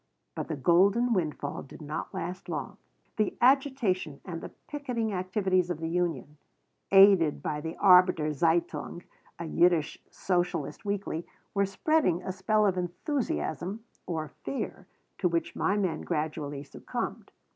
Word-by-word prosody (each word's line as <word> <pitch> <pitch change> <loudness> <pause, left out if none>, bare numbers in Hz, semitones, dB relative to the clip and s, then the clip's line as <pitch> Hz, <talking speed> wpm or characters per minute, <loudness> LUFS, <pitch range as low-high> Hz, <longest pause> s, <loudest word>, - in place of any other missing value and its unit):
But - - -4
the 160 - -2
golden 195 - +4
windfall 155 -6 -2
did - - -12
not 150 0 -5
last 180 +2 -5
long. - - -4 0.4
The 215 -2 0
agitation 245 - +2
and 170 -3 -5
the - - -7 0.2
picketing 250 -7 -2
activities 185 -1 +1
of 175 -3 -2
the 160 - -3
union, 170 -3 -2 0.5
aided 195 -6 +6
by 150 -1 -2
the 160 +1 -5
Arbeiter 180 -5 +5
Zeitung, 170 +3 0 0.3
a 170 - -5
Yiddish 170 -1 +2
socialist 180 +3 -2
weekly, 200 -5 -3 0.3
were 200 -1 +2
spreading 195 - +1
a - - -3
spell 210 +3 +2
of 185 -2 +2
enthusiasm 205 - -3 0.2
(or 160 -3 -3
fear) 275 - -4 0.3
to 180 - +2
which 170 -1 -1
my 200 - +1
men 185 -5 -1
gradually 150 -2 -3
succumbed. 140 - -5
180 Hz, 135 wpm, -29 LUFS, 165-200 Hz, 0.5 s, aided